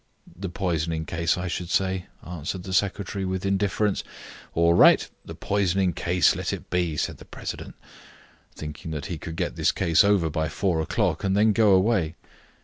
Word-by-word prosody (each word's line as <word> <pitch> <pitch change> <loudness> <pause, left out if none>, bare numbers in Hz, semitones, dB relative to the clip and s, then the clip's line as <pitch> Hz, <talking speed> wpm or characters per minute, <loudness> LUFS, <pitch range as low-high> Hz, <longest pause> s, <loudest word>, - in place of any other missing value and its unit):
"The 95 +1 -5
poisoning 85 -3 -2
case, 85 +2 0
I 90 +1 -3
should 85 0 -4
say," 95 0 0 0.2
answered 90 +2 -5
the 95 - -6
secretary, 100 0 0
with 95 0 -2
indifference. 100 +1 0 0.5
"All 85 0 +4
right; 85 - +6 0.2
the - - -9
poisoning 95 -2 +1
case 90 +2 +2
let - - -2
it - - -7
be," 85 -4 0
said - - -2
the - - -12
president, - - -7 0.8
thinking 75 +1 -7
that 75 -3 -4
he 85 -3 -5
could 80 0 -7
get 90 0 -3
this - - +3
case 80 -2 +3
over 100 -5 +3
by 80 0 -1
four 85 0 0
o'clock, 80 - -1
and 95 0 +1
then 105 +1 +4
go 105 -2 +4
away. 95 -4 +2
90 Hz, 175 wpm, -25 LUFS, 80-95 Hz, 0.8 s, right